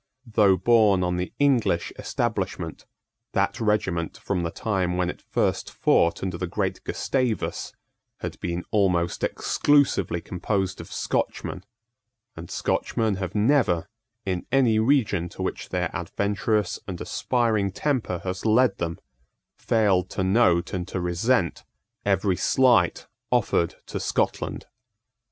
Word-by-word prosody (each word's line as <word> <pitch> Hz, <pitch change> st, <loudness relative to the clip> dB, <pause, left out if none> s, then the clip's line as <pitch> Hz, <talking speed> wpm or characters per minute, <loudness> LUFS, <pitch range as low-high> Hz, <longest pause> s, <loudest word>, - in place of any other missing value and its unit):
Though 105 Hz, -4 st, +4 dB
borne 105 Hz, -2 st, +4 dB
on 90 Hz, 0 st, 0 dB
the 90 Hz, 0 st, -3 dB
English 125 Hz, -11 st, +2 dB
establishment, -, -, -3 dB, 0.5 s
that -, -, 0 dB
regiment, 95 Hz, -6 st, 0 dB
from 95 Hz, -3 st, -2 dB
the 85 Hz, -, -1 dB
time 90 Hz, -2 st, -1 dB
when 90 Hz, -1 st, +1 dB
it -, -, -15 dB
first -, -, -1 dB
fought 85 Hz, +1 st, +2 dB
under 90 Hz, -2 st, -3 dB
the 90 Hz, -, -2 dB
great -, -, -2 dB
Gustavus, 125 Hz, -5 st, -1 dB, 0.5 s
had -, -, -5 dB
been 85 Hz, 0 st, -3 dB
almost 90 Hz, -4 st, +1 dB
exclusively 135 Hz, -, +2 dB
composed 95 Hz, +1 st, -2 dB
of 85 Hz, -, -12 dB
Scotchmen; 90 Hz, -, -2 dB, 0.7 s
and 80 Hz, +1 st, -9 dB
Scotchmen 110 Hz, -4 st, 0 dB
have 95 Hz, -1 st, -4 dB
never, 105 Hz, -, +2 dB, 0.4 s
in 90 Hz, -2 st, -2 dB
any 120 Hz, -5 st, +4 dB
region 110 Hz, -8 st, +2 dB
to -, -, -6 dB
which -, -, -4 dB
their -, -, -1 dB
adventurous 100 Hz, 0 st, -1 dB
and 90 Hz, -3 st, -5 dB
aspiring 110 Hz, -6 st, 0 dB
temper 115 Hz, -, -1 dB
has 95 Hz, -1 st, -4 dB
led 115 Hz, 0 st, +3 dB
them, 85 Hz, +1 st, -2 dB, 0.6 s
failed 95 Hz, -5 st, +2 dB
to 95 Hz, -, +1 dB
note 95 Hz, -3 st, +3 dB
and 90 Hz, -1 st, -3 dB
to 95 Hz, -, -3 dB
resent 90 Hz, +3 st, 0 dB, 0.4 s
every 95 Hz, -1 st, +2 dB
slight 120 Hz, -3 st, +3 dB, 0.2 s
offered 85 Hz, -, +1 dB
to -, -, -5 dB
Scotland. -, -, -1 dB
95 Hz, 130 wpm, -25 LUFS, 90-110 Hz, 0.7 s, Though